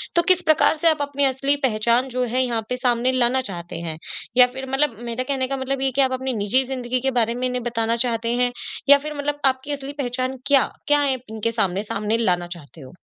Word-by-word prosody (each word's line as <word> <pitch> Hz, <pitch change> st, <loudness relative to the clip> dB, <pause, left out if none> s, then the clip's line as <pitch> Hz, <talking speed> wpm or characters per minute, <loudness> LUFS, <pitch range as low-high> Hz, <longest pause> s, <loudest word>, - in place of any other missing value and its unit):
तो 340 Hz, -, +5 dB
किस 365 Hz, -1 st, +4 dB
प्रकार 310 Hz, +1 st, +4 dB
से 330 Hz, +2 st, +3 dB
आप 315 Hz, -2 st, 0 dB
अपनी 285 Hz, 0 st, 0 dB
असली 275 Hz, +2 st, +1 dB
पहचान 235 Hz, +2 st, +1 dB
जो 255 Hz, -, +1 dB
है 260 Hz, +1 st, +3 dB
यहाँ 235 Hz, -2 st, -1 dB
पे 250 Hz, -, -1 dB
सामने 250 Hz, 0 st, +1 dB
लाना 255 Hz, 0 st, +2 dB
चाहते 170 Hz, -1 st, -7 dB
हैं? 160 Hz, -2 st, -5 dB, 0.4 s
या 250 Hz, -1 st, +8 dB
फिर 265 Hz, 0 st, -6 dB
मतलब 270 Hz, -3 st, +1 dB
मेरा 245 Hz, +2 st, -2 dB
कहने 260 Hz, -1 st, -1 dB
का 275 Hz, +1 st, -2 dB
मतलब 265 Hz, 0 st, -2 dB
ये -, -, +1 dB
है -, -, 0 dB
कि -, -, +7 dB
आप 265 Hz, -1 st, +2 dB
अपनी 260 Hz, 0 st, -2 dB
निजी 255 Hz, +6 st, +3 dB
ज़िंदगी 255 Hz, -1 st, -2 dB
के 265 Hz, +1 st, 0 dB
बारे 230 Hz, 0 st, +1 dB
में 255 Hz, +1 st, -1 dB
इन्हें 250 Hz, -1 st, -3 dB
बताना 230 Hz, -1 st, 0 dB
चाहते 230 Hz, 0 st, -1 dB
हैं 245 Hz, -, +1 dB, 0.4 s
या 285 Hz, -, +9 dB
फिर 305 Hz, -, -4 dB
मतलब 290 Hz, 0 st, -2 dB
आपकी 265 Hz, +2 st, 0 dB
असली 280 Hz, 0 st, -5 dB
पहचान 255 Hz, +1 st, -2 dB
क्या? 280 Hz, -2 st, +4 dB, 0.2 s
क्या 295 Hz, 0 st, +4 dB
है, 270 Hz, -2 st, +1 dB
इनके 220 Hz, +1 st, -2 dB
सामने, 200 Hz, -3 st, 0 dB
सामने 215 Hz, +1 st, -1 dB
लाना 180 Hz, -6 st, +1 dB
चाहते 150 Hz, 0 st, -15 dB
हो? 130 Hz, -1 st, -12 dB
255 Hz, 240 wpm, -22 LUFS, 230-270 Hz, 0.4 s, या